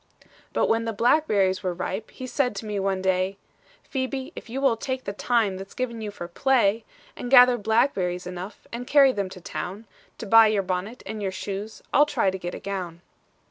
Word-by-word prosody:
"'But - - +1
when 225 0 +1
the 225 - -2
blackberries 205 -6 +2
were 180 -3 -2
ripe, 195 +4 -4
He 255 - -8
said 255 -3 0
to 200 - -6
me 210 -1 -2
one 190 -1 -1
day, 190 +1 +1 0.5
"Phebe, 265 0 -4
if - - -9
you 255 +4 -3
will 270 -4 +3
take 260 +3 -4
the 200 - -4
time 215 -3 +1
That's 195 +1 -10
given 235 -3 -3
you 215 - -4
for 200 -4 -7
play, 230 +1 +2 0.3
"'"And 245 - -6
gather 250 -1 +8
blackberries 200 -5 +1
enough, 180 +3 -8
And 245 +1 -5
carry 280 -2 +6
them 200 -5 -3
to 185 - -10
town, 190 +4 -6 0.3
To - - -6
buy 225 +1 +7
your 210 -2 +1
bonnet 185 +6 -4
and 215 -1 -5
your 195 -2 -1
shoes, 205 +3 -6
I'll 295 +2 +6
try 230 -10 +1
to 190 - -5
get 175 0 -5
a - - -7
gown." 180 -3 -5
210 Hz, 205 wpm, -25 LUFS, 190-245 Hz, 0.5 s, gather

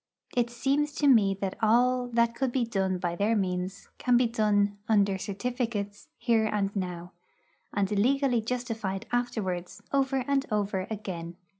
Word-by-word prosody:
It 240 -1 +2
seems 275 +5 0
to 290 - +2
me 210 -7 +5
that 195 -1 -3
all 245 +3 +3
that 235 -1 +2
could 260 +1 -1
be 245 -1 +1
done 190 -4 0
by 175 -1 -2
their 210 +5 +1
means 185 0 -2
can 250 -1 +4
be 250 - +4
done 205 -3 +1
'under 200 -3 +3
certificates' 205 0 -3
here 230 -2 +2
and 200 -1 -1
now, 180 -2 -4 0.6
and 200 -1 0
legally 250 +3 +2
justified 220 -5 -3
afterwards 215 -8 -2
over 270 -2 +1
and 280 -1 +2
over 200 -3 -1
again. 180 -6 -5
215 Hz, 150 wpm, -28 LUFS, 195-245 Hz, 0.6 s, me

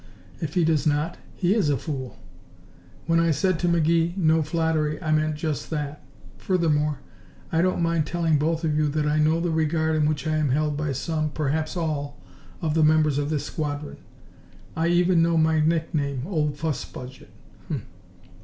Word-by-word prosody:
If 160 0 -4
he 175 -3 +3
does 155 -2 +2
not, 150 +3 0 0.2
he 185 0 +2
is 210 -9 +2
a 140 - +2
fool. 130 -2 -5 0.9
When 165 0 +3
I 170 0 +3
said 165 +3 +1
to 175 - 0
McGee, 170 +1 +2
'no 160 -3 +3
flattery' 155 -1 0
I 155 -3 -2
meant 155 0 +2
just 150 -3 -3
that. 150 -1 -4 0.4
Furthermore, 150 -5 +1 0.5
I 165 - +2
don't 185 -1 +1
mind 165 -2 +1
telling 165 -3 +1
both 160 +2 0
of 155 -2 +1
you 155 0 +2
that 150 +1 -1
I 150 +1 +1
know 155 +2 +3
the 170 0 -1
regard 160 0 +1
in 150 -1 +2
which 155 0 -2
I 155 0 +1
am 150 -2 +1
held 150 +2 +1
by 150 0 -2
some 155 +3 -2
perhaps 155 +3 -2
all 145 -4 -3 0.5
of 155 -2 0
the 160 0 +3
members 155 -2 +3
of 145 0 -1
this 155 -2 -1
squadron. 145 -1 -4 0.8
I 165 +1 +1
even 175 0 +3
know 165 0 +2
my 160 0 +3
nickname, 155 -4 0
'Old 150 -6 -1
Fuss 155 -3 -2
Budget'. 125 +1 -10
155 Hz, 180 wpm, -25 LUFS, 150-165 Hz, 0.9 s, he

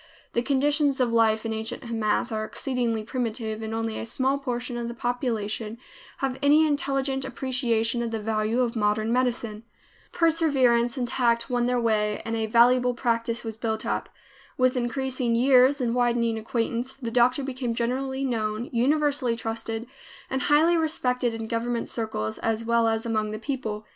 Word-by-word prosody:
The 235 - +2
conditions 285 +1 +2
of 245 -2 +1
life 220 -1 +3
in 225 - -1
ancient 220 +4 -4
Hamath 230 0 -1
are 215 -1 -2
exceedingly 235 -2 -2
primitive 225 -2 -3
and 220 0 -4
only 225 0 -2
a - - -4
small 265 +4 0
portion 245 -2 -3
of 235 -1 -3
the 235 - -6
population 230 -3 -2 0.4
have 265 -1 -2
any 295 +2 +5
intelligent 275 -2 0
appreciation 245 -3 0
of 235 - -2
the 225 -1 -3
value 215 +2 0
of 240 -1 0
modern 215 +1 +1
medicine. 240 -4 -1 0.5
Perseverance 275 -8 +2
and 245 -2 -1
tact 235 -1 +1
won 245 -1 +1
their 250 0 +1
way 210 -2 +1
and 225 - -2
a 220 -1 -1
valuable 245 +2 +4
practice 230 -1 -1
was 225 -2 -5
built 220 -1 -3
up. - - -2 0.5
With 255 0 +3
increasing 250 -1 -1
years 260 +3 +5
and 240 -3 0
widening 240 -2 +1
acquaintance, 235 +2 -2
the 245 -4 -5
doctor 250 +3 +3
became 255 -3 -3
generally 265 +3 -1
known, 220 -1 -2
universally 275 0 +2
trusted, 225 0 -4 0.5
and 265 - 0
highly 315 +5 +4
respected 250 -7 0
in 225 0 -5
government 235 +1 -2
circles 165 - -3
as 225 0 -1
well 235 0 +3
as 225 0 0
among 215 -2 0
the 215 - -4
people. 220 -4 -4
235 Hz, 165 wpm, -26 LUFS, 225-260 Hz, 0.5 s, any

